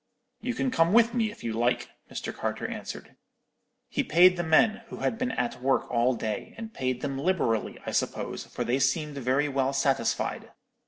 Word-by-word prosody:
You 250 Hz, -1 st, -3 dB
can 260 Hz, 0 st, 0 dB
come 165 Hz, -4 st, +3 dB
with 230 Hz, 0 st, +5 dB
me, 225 Hz, -3 st, +1 dB
if 210 Hz, -, -12 dB
you 115 Hz, -, -2 dB
like,' 120 Hz, +2 st, 0 dB, 0.2 s
Mr. -, -, -4 dB
Carter -, -, -3 dB
answered. -, -, -7 dB, 0.7 s
"He -, -, -1 dB
paid 180 Hz, +3 st, +6 dB
the 175 Hz, -, -1 dB
men, 175 Hz, +7 st, +3 dB
who -, -, -8 dB
had 225 Hz, -, -1 dB
been 255 Hz, -, 0 dB
at 125 Hz, 0 st, -2 dB
work 135 Hz, +1 st, +2 dB
all 120 Hz, +1 st, +2 dB
day, 110 Hz, -2 st, -4 dB
and 225 Hz, -1 st, -7 dB
paid 130 Hz, -1 st, -2 dB
them 135 Hz, -2 st, -3 dB
liberally, 140 Hz, -, 0 dB
I -, -, -3 dB
suppose, -, -, -2 dB
for -, -, -4 dB
they 125 Hz, +3 st, 0 dB
seemed 145 Hz, +2 st, 0 dB
very 135 Hz, +3 st, +1 dB
well 135 Hz, -1 st, 0 dB
satisfied. 135 Hz, 0 st, 0 dB
140 Hz, 190 wpm, -28 LUFS, 130-210 Hz, 0.7 s, paid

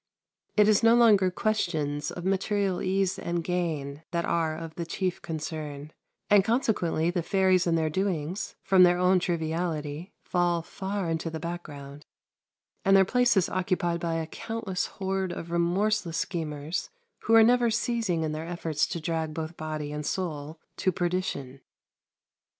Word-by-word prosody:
It 210 Hz, -1 st, +6 dB
is 215 Hz, -2 st, +4 dB
no 230 Hz, 0 st, +6 dB
longer 210 Hz, -6 st, +5 dB
questions 160 Hz, -8 st, -1 dB
of 175 Hz, -, -7 dB
material 195 Hz, 0 st, 0 dB
ease 190 Hz, +1 st, 0 dB
and 170 Hz, 0 st, -2 dB
gain 160 Hz, -5 st, -2 dB
that 170 Hz, 0 st, -1 dB
are 160 Hz, -2 st, 0 dB
of 165 Hz, -1 st, -7 dB
the 170 Hz, -, -4 dB
chief 180 Hz, +2 st, -2 dB
concern; 155 Hz, -2 st, -5 dB, 0.3 s
and 205 Hz, -2 st, +6 dB
consequently 185 Hz, -8 st, +1 dB
the 175 Hz, -1 st, -1 dB
fairies 185 Hz, 0 st, +2 dB
and 165 Hz, -1 st, +3 dB
their 160 Hz, -1 st, 0 dB
doings, 185 Hz, 0 st, -2 dB
from 190 Hz, -1 st, +5 dB
their 175 Hz, -1 st, +6 dB
own 180 Hz, +1 st, +4 dB
triviality, 165 Hz, -1 st, -2 dB
fall 175 Hz, -1 st, +1 dB
far 195 Hz, +1 st, -4 dB
into 165 Hz, 0 st, -2 dB
the 160 Hz, 0 st, -5 dB
background, 150 Hz, -4 st, -7 dB, 0.8 s
and 195 Hz, 0 st, +6 dB
their 190 Hz, -, +6 dB
place 245 Hz, +1 st, +3 dB
is 185 Hz, -, +3 dB
occupied 180 Hz, -2 st, 0 dB
by 170 Hz, -1 st, -1 dB
a 165 Hz, -1 st, -1 dB
countless 225 Hz, +1 st, -4 dB
horde 190 Hz, -1 st, -2 dB
of 170 Hz, -1 st, -6 dB
remorseless 175 Hz, 0 st, +1 dB
schemers, 160 Hz, -3 st, -3 dB, 0.4 s
who 225 Hz, -, +5 dB
are 225 Hz, -, +9 dB
never 240 Hz, +1 st, +4 dB
ceasing 225 Hz, -7 st, 0 dB
in 155 Hz, -, -1 dB
their 155 Hz, +2 st, -5 dB
efforts 165 Hz, -3 st, -1 dB
to 170 Hz, -, -4 dB
drag 160 Hz, -1 st, -2 dB
both 160 Hz, +1 st, -4 dB
body 155 Hz, -2 st, -4 dB
and 150 Hz, 0 st, -4 dB
soul 155 Hz, -4 st, -3 dB, 0.2 s
to 185 Hz, -, +1 dB
perdition. 170 Hz, -7 st, -2 dB
175 Hz, 155 wpm, -27 LUFS, 160-190 Hz, 0.8 s, are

